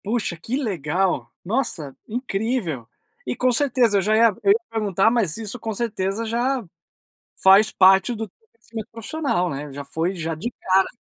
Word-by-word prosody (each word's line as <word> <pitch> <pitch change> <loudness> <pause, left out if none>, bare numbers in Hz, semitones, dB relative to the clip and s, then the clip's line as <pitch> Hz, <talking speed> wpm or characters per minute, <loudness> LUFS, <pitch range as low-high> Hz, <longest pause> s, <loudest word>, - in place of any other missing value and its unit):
Puxa, 210 -3 -1
que 225 +10 -3
legal! 180 - -1
Nossa, 180 - -2
incrível! 215 - -2 0.4
E - - -2
com 255 0 +2
certeza 245 -4 +2
eu - - +3
já 215 +3 +2
ia 225 -2 +5
eu 200 - +5
ia 215 - +4
perguntar, 215 -2 +2
mas 215 -10 0
isso 225 +2 -6
com 220 0 -3
certeza 205 -1 -2
já 245 +3 0 0.8
faz 195 +3 +6
parte 190 +4 +5
do 220 0 -4 0.2
crescimento 230 - -9
profissional, 230 - -1
né. 145 0 -5
Já 140 +1 -6
foi 165 +6 -2
já 165 -1 -3
de 205 +10 -4
cara. 190 +1 +3
210 Hz, 165 wpm, -23 LUFS, 180-235 Hz, 0.8 s, faz